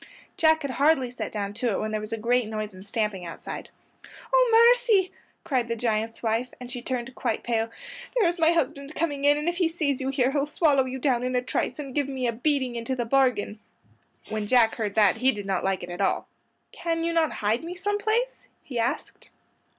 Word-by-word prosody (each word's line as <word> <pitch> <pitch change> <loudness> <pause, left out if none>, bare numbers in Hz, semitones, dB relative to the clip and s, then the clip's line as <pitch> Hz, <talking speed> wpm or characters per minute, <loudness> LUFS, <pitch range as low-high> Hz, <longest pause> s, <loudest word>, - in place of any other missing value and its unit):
Jack 315 -1 +3
had 280 - -2
hardly 270 -2 +2
set 250 - -5
down 200 -1 -3
to 235 +3 -1
it - - -1
when 215 - -2
there 215 0 -2
was 215 +1 -7
a 225 - -1
great 240 +1 +1
noise 215 -1 -4
and 185 0 -11
stamping 210 -2 -2
outside. 165 -1 -7 0.6
"Oh, 470 -2 +6
mercy!" 450 -7 +3 0.3
cried 260 -8 0
the 230 - -1
giant's 225 0 -2
wife, 230 +2 0
and 250 0 -8
she 245 -1 -5
turned 250 0 -3
quite - - -2
pale. 230 -1 0 0.5
"There's 355 -7 +2
my 325 0 +5
husband 295 -2 -1
coming 290 -4 -1
in, 290 0 +5
and 300 +2 -3
if 345 0 0
he 355 -2 +3
sees 300 -5 -1
you 265 - -1
here 265 -1 +1
he'll 285 0 0
swallow 290 -3 +3
you 260 0 -4
down 255 -2 +1
in 255 0 -1
a 250 - +2
trice, 255 0 -2
and 275 -3 -6
give 285 -1 0
me 260 -2 -2
a 235 - +2
beating 260 0 0
into 235 +3 -2
the 240 -2 -2
bargain." 245 -4 +1 0.7
When 215 -1 -3
Jack 235 -1 +4
heard 210 -3 -3
that 215 -1 +4
he 255 +3 +3
did 205 -4 -6
not 190 -2 -1
like 190 -1 0
it 175 - -6
at 175 - -5
all. - - 0 0.4
"Can 330 -1 -2
you 335 0 0
not 325 -2 +2
hide 215 +5 0
me 345 +2 -6
some 410 +3 -1
place?" 455 +4 -1 0.2
he 245 -4 -4
asked. 230 +1 -3
255 Hz, 220 wpm, -26 LUFS, 225-310 Hz, 0.7 s, Oh